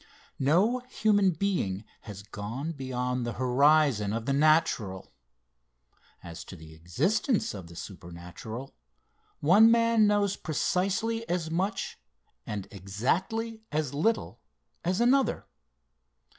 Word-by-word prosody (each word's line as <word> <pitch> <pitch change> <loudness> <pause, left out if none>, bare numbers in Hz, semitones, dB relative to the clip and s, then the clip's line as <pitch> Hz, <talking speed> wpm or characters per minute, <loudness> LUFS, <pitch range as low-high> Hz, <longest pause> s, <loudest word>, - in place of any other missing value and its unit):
No 185 - +3
human 205 -5 +3
being 160 - -1 0.3
has 100 -1 -8
gone 115 +10 -5
beyond 125 -3 -3
the 120 0 -3
horizon 130 -3 +3
of 115 0 -3
the 140 - 0
natural. 140 - +1 1.1
As 85 -1 -8
to - - -10
the 80 -2 -13
existence 155 - 0
of 95 -5 -8
the 85 - -13
supernatural, 90 +8 -9 0.7
one 200 +9 +7
man 230 -2 +4
knows 205 -1 +1
precisely 200 +8 -1
as 170 -2 -1
much, 195 +4 -2 0.5
and 100 -3 -4
exactly 175 - -2
as 150 -3 -1
little 195 +11 0 0.4
as 180 +3 0
another. 255 +3 +2
150 Hz, 110 wpm, -28 LUFS, -, 1.1 s, one